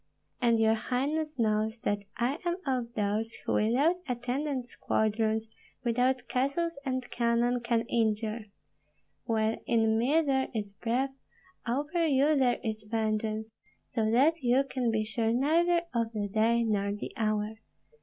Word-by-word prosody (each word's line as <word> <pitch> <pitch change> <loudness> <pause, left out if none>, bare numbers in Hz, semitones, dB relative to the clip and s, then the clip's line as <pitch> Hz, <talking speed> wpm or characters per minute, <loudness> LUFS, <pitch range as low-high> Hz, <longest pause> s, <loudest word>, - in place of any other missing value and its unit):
And 235 -2 +3
your 220 0 +4
highness 275 +6 -1
knows 220 0 +1
that 205 0 +1 0.2
I 260 +6 0
am 345 0 0
of 250 -4 -1
those 215 +2 -1
who - - 0
without 270 +11 +3
attendant 250 +2 -2
squadrons, 220 -1 0 0.4
without 250 +2 +1
castles 280 +5 0
and 255 -2 -2
cannon, 240 +1 +1
can 235 -1 +1
injure. 220 -1 -1 0.8
While 220 -1 +1
in 225 -1 +3
me 285 +8 +3
there 270 -3 +1
is 205 -2 -3
breath, 250 +6 -1 0.5
over 295 +7 0
you 290 +2 +3
there 255 -3 +3
is 220 -2 -2
vengeance, 220 0 -1 0.4
so 220 -3 +1
that 290 +8 +3
you 255 +2 +3
can 255 -3 -1
be 220 -1 +1
sure 225 +1 0
neither 335 +7 +3
of 230 -1 -1
the 205 -2 -2
day 225 +3 +2
nor 200 -2 0
the 205 - -6
hour. 215 0 -1
235 Hz, 145 wpm, -29 LUFS, 220-265 Hz, 0.8 s, your